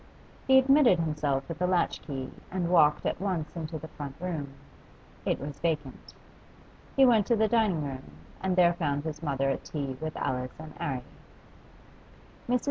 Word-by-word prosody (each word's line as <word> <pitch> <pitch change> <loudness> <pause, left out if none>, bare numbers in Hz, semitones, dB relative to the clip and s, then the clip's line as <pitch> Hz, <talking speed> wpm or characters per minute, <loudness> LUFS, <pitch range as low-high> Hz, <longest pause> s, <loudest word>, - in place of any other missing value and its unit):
He 265 0 +7
admitted 265 -6 +6
himself 150 -4 -1
with 165 +1 -6
a 180 - +3
latch 180 -1 +1
key 135 -3 -5 0.2
and 175 -2 -1
walked 150 -4 +5
at - - -1
once 180 -6 -2
into 160 -1 -4
the 160 +1 -8
front 145 -3 -7
room; 160 -6 -4 0.8
it - - +1
was 140 0 -7
vacant. 150 -5 -3 0.8
He 270 - +7
went 225 -5 +4
to 235 - +4
the 220 0 +3
dining 215 -9 +2
room 135 - -6 0.3
and 190 -1 0
there 175 -1 +5
found 145 -4 -1
his 155 -1 -5
mother 135 -3 0
at - - -3
tea 140 -4 -4
with 155 0 -4
Alice 125 +1 -3
and 155 -1 -9
'Arry. 130 -3 -2 1.5
Mrs. 250 0 +3
160 Hz, 170 wpm, -29 LUFS, 140-185 Hz, 1.5 s, He